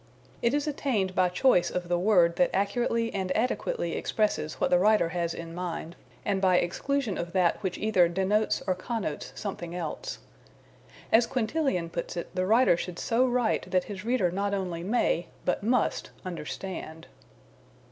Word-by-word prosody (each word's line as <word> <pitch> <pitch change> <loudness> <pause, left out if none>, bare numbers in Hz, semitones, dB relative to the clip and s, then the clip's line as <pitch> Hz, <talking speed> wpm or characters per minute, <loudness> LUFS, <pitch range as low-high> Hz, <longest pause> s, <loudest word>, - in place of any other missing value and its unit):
It 235 +4 +2
is 290 - 0
attained 240 -10 0
by 185 -1 +3
choice 180 0 +3
of 180 -1 -3
the 175 0 +1
word 175 -4 +4
that 270 - +4
accurately 230 +3 0
and 190 -2 -2
adequately 260 - -1
expresses 210 -8 -1
what - - 0
the 180 - +5
writer 210 -3 +4
has 170 0 -1
in 165 0 -7
mind, 175 -1 -5 0.3
and 200 -2 0
by 185 -2 +4
exclusion 235 +5 -1
of 170 0 -4
that 180 -1 +2
which 190 -3 -2
either 200 -5 +3
denotes 195 +4 +1
or 185 - +2
connotes 185 -4 -4
something 175 -4 -5
else. 165 -4 -4 0.9
As 230 +1 +5
Quintilian 245 - -1
puts 170 +1 -4
it, 170 - -5
the 185 0 0
writer 225 -2 +5
should 175 0 -5
so 245 +2 +2
write 245 -6 0
that 185 -1 +2
his 200 -2 -7
reader 225 -6 +1
not 200 +2 -1
only 180 -4 -3
may, 180 -3 +1 0.2
but 180 - 0
must, 235 +3 +1 0.2
understand. 170 -1 -6
190 Hz, 165 wpm, -28 LUFS, 175-230 Hz, 0.9 s, the